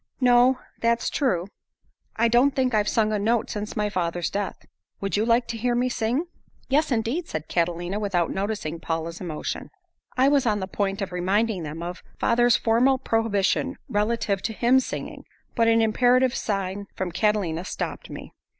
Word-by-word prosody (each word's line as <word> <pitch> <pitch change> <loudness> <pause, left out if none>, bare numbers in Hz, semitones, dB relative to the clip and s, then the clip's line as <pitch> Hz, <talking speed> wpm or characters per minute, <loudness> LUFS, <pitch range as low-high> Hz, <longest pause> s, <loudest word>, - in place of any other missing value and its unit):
"No, 250 0 +5 0.2
that's 235 0 +1
true. 185 - 0 0.7
I 230 +1 +3
don't 245 +4 +3
think 255 -2 +1
I've 210 -1 +2
sung 215 -1 +2
a 210 - 0
note 225 +2 +1
since 210 0 -5
my 210 0 +1
father's 175 -3 -2
death. 200 0 -4 0.3
Would 195 0 -2
you 210 - +2
like 235 +1 +3
to 235 - -3
hear 245 +1 +1
me 250 +1 +1
sing?" 240 +7 -1 0.4
"Yes, 295 +2 +2
indeed," 245 +9 -1
said 155 -1 -5
Catalina, 175 +3 -1
without 185 -5 0
noticing 195 -5 -3
Paula's 165 0 -4
emotion. 160 -4 -4 0.5
I 260 +1 +5
was 280 -3 +3
on 210 -2 +2
the 190 - -2
point 195 +1 -2
of 190 - -5
reminding 190 +3 0
them 160 +1 -6
of 175 +1 -6 0.2
father's 240 -1 +3
formal 240 +5 +3
prohibition 225 +2 0
relative 210 -2 0
to 225 - -3
hymn 245 +4 +4
singing, 260 - -5 0.3
but 230 -1 +2
an 225 0 +4
imperative 245 +3 +3
sign 200 -1 -3
from 185 -2 -3
Catalina 180 -3 0
stopped - - -5
me. - - -9
215 Hz, 170 wpm, -25 LUFS, 190-240 Hz, 0.7 s, No